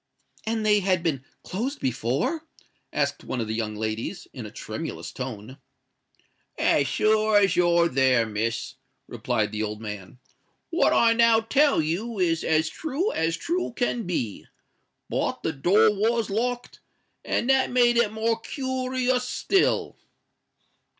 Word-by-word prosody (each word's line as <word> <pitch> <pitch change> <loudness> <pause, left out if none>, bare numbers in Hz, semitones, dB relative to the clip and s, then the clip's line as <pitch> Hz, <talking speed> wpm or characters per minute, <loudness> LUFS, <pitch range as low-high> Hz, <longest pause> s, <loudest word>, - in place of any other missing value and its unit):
"And 220 -1 -1
they 210 -1 +5
had 185 -3 +1
been 145 -6 -1 0.2
closed 250 +10 -3
before?" 135 - -1 0.4
asked - - -1
one 125 - -4
of 115 - -2
the 110 - -3
young 110 -1 -3
ladies, 110 +1 -4
in - - -7
a - - -11
tremulous - - -6
tone. 125 +1 -7 1.0
"As 140 - +2
sure 215 - +3
as 195 -3 +3
you're 170 -1 +4
there, 130 -5 +3
Miss," 115 +5 -3 0.3
replied 115 -2 -1
the 110 0 -3
old 105 0 -3
man, 105 -1 -8 0.5
"what 340 - +3
I 230 -1 +5
now 230 -1 +5
tell 270 - +3
you 205 +9 -3
is 165 -3 +1
as 160 0 +2
true 320 - -2
as 165 +1 0
true 345 - -2
can 240 -4 -1
be. 120 - -3 0.6
But - - -2
the 160 - -1
door 180 +9 +4
was 220 +1 0
locked—and 245 +1 -4
that 265 -1 +3
made 245 -1 +4
it 235 -3 +3
more 225 +1 -1
koorious 255 -1 -1
still." 390 -1 +1
195 Hz, 140 wpm, -25 LUFS, -, 1.0 s, they